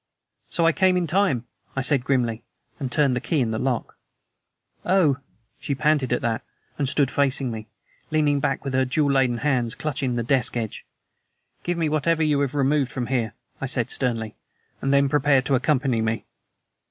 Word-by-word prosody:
"So 170 - +1
I 165 - +6
came 185 +1 +3
in 180 - +1
time," 160 - +1 0.3
I 135 - 0
said 135 -1 +3
grimly, 120 -4 0 0.4
and 135 -4 -3
turned 140 -1 +2
the 125 - -2
key 160 - 0
in 120 -4 +1
the 110 - -2
lock. 130 -4 -2 0.8
"Oh!" 170 -8 +3 0.4
she 140 - -2
panted 150 -3 +1
at 125 - 0
that, 115 -1 0 0.4
and 140 -2 +1
stood 140 -2 +2
facing 135 -2 +1
me, 110 -1 -7 0.4
leaning 150 -2 +2
back 135 +1 -1
with 135 - -3
her 130 0 +3
jewel 140 +3 +1
laden 130 -3 +2
hands 125 -4 0
clutching 135 -4 -2
the 120 - -1
desk 125 0 +1
edge. 110 -3 -5 0.7
"Give 175 0 -2
me 165 -2 +1
whatever 160 +2 +1
you 150 -2 +2
have 140 0 -1
removed 140 -1 +1
from 125 - -3
here," 115 -4 -1 0.3
I 135 - -1
said 125 -3 -1
sternly, 115 -4 -1 0.5
"and 135 - 0
then 140 0 +4
prepare 140 -1 +3
to 140 - -1
accompany 130 -2 +1
me." 110 0 -1
135 Hz, 185 wpm, -24 LUFS, 125-150 Hz, 0.8 s, I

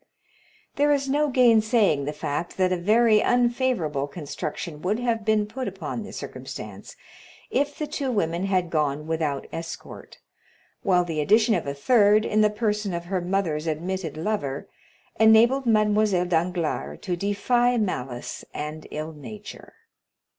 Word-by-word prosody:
There 290 +1 +3
is 280 -1 +1
no 295 +2 +1
gainsaying 220 - +4
the 150 - -2
fact 150 +3 -4
that 185 -1 +2
a - - +2
very 215 +4 +4
unfavorable 240 - +1
construction 150 +1 -6
would 200 +5 0
have 235 -2 -1
been 215 0 +2
put 255 +5 -5
upon 195 +4 -5
the 215 - -8
circumstance - - -8 0.6
if 285 0 0
the 305 - -2
two 285 -3 -3
women 175 -4 0
had 185 -3 0
gone 150 -1 0
without 155 -4 -2
escort, 165 0 -8 0.6
while 180 -3 +3
the 160 -3 -2
addition 220 +7 +4
of - - -1
a 140 - -3
third, 210 - +4
in 215 - +2
the 210 - +5
person 210 -3 -1
of 170 0 -5
her 185 0 -2
mother's 175 -4 -1
admitted 165 0 -3
lover, 155 -7 -2 0.5
enabled 230 +4 +5
Mademoiselle 210 -4 +3
Danglars 165 - -1
to 180 - -2
defy 240 +6 +1
malice 130 - -3
and 150 +1 -5
ill 155 +1 -5
nature. 205 +8 -10
195 Hz, 145 wpm, -25 LUFS, 160-225 Hz, 0.6 s, the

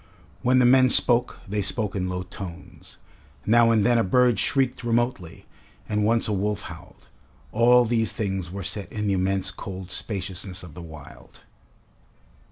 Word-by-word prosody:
When 130 +1 +3
the 125 - +5
men 130 +1 +6
spoke, 120 0 +2
they 105 +1 -1
spoke 105 +1 -3
in 90 -1 -2
low 90 0 -3
tones. 90 -1 -10 0.5
Now 115 +1 +5
and 110 -3 +3
then 120 -1 +4
a - - +3
bird 120 +3 +3
shrieked 130 -3 0
remotely, 120 -7 -2 0.4
and 105 -1 0
once 115 +2 +2
a 105 - -1
wolf 105 +1 -1
howled. - - -12 0.4
All 120 +2 +5
these 115 -1 0
things 95 -5 -3
were 95 +2 -6
set 100 +2 -5
in 105 -1 -3
the 100 - +1
immense 95 0 0
cold 95 0 -8
spaciousness 95 -2 -5
of 85 -4 -11
the 85 - -9
wild. 80 -3 -13
105 Hz, 165 wpm, -24 LUFS, 95-120 Hz, 0.5 s, men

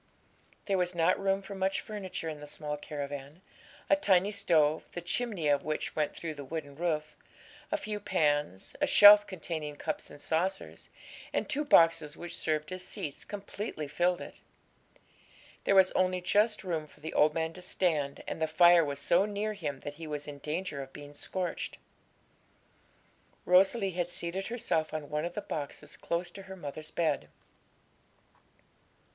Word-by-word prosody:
There 195 -2 +1
was 180 0 0
not 170 +2 +3
room 195 0 +1
for 200 - -8
much 190 0 0
furniture 190 -5 -5
in 155 -2 -5
the 150 - -9
small 150 0 -4
caravan; 145 +2 -7 0.4
a - - +6
tiny 200 -8 +3
stove, 160 -7 +3
the - - -3
chimney 185 -1 -1
of 145 -1 +3
which 155 0 -3
went 150 -2 0
through 160 -2 -4
the 145 -1 -8
wooden 145 -1 -6
roof, 155 -2 -2 0.6
a 310 - +2
few 210 -7 -4
pans, 145 - 0
a - - +3
shelf 205 0 +9
containing 160 -5 -5
cups - - -4
and - - -12
saucers, 180 +6 -2 0.4
and - - -1
two 295 - 0
boxes 165 - +4
which 175 0 -6
served 155 +1 -1
as 185 0 -5
seats, 145 -5 -5
completely 200 -5 -5
filled 175 +5 +1
it. - - -10 1.2
There 195 - +4
was 190 -1 +6
only 185 0 +1
just 210 +5 +2
room 165 -4 -2
for - - -21
the 160 +2 -6
old 150 0 +4
man 160 0 -1
to 180 - -11
stand, 155 -6 -1
and - - -4
the 160 - +2
fire 175 +2 +6
was 140 -2 -3
so 175 +3 +3
near 210 +1 -2
him 145 -9 -5
that 145 - -6
he 160 - -5
was 150 -1 -4
in 145 -1 -7
danger 155 -1 -3
of 135 0 -9
being 145 0 -10
scorched. 180 +4 -4 1.7
Rosalie 190 +3 +4
had 175 -1 -2
seated 175 +3 -3
herself 165 -10 -1
on 150 -2 -5
one 150 +2 -1
of 175 - -5
the 210 - -2
boxes 145 -7 -6
close 175 +1 -3
to 195 - -10
her 190 0 -9
mother's 155 -2 -7
bed. 150 - 0
170 Hz, 170 wpm, -31 LUFS, 150-190 Hz, 1.7 s, shelf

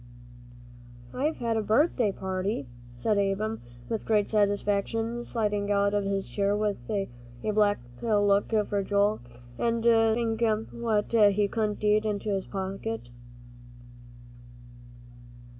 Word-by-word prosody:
"I've 300 +5 0
had 230 -2 -1
a - - +1
birthday 225 0 +2
party," 190 -3 -3 0.3
said 200 - +1
Ab'm, 200 +3 -1 0.3
with 225 -2 -3
great 210 -2 +2
satisfaction, 210 +3 0
sliding 210 -4 -1
out 200 0 +2
of 205 -1 0
his 195 -1 -1
chair 200 0 0
with 210 -1 0
a 200 -3 -1 0.4
black 210 -1 +2 0.2
look 205 -2 +2 0.2
for 205 -1 0
Joel, 205 +2 +1 0.4
and 230 -1 0
stuffing 225 0 +3 0.3
what 225 -2 -1
he 205 -2 +4
couldn't 215 -1 -2
eat 210 0 +3
into 210 0 -2
his 195 -1 -2
pocket. 195 - -4
210 Hz, 115 wpm, -28 LUFS, 200-225 Hz, 0.4 s, he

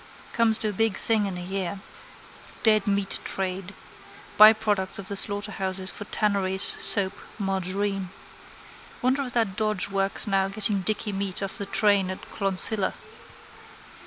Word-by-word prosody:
Comes 225 -2 +2
to 220 - -3
a - - -4
big 225 +1 +1
thing 220 -3 +1
in 185 -2 -5
a 180 - -6
year. 190 0 -4 0.8
Dead 215 -2 +3
meat 200 -1 0
trade. 190 +1 -4 0.6
Byproducts 215 -3 +5
of 195 - -8
the 200 - -3
slaughterhouses 195 -2 -1
for 205 - -8
tanneries, 195 -3 0
soap, 195 -2 +3 0.2
margarine. 195 -1 -2 0.9
Wonder 260 +3 +2
if 245 - -7
that 225 -5 0
dodge 215 -2 0
works 195 +2 +1
now 195 -2 +1
getting 200 0 0
dicky 215 +2 +1
meat 195 0 -3
off 195 - -5
the 200 - -4
train 200 -2 +2
at 185 - -6
Clonsilla. 195 0 0
200 Hz, 140 wpm, -25 LUFS, 190-215 Hz, 0.9 s, Byproducts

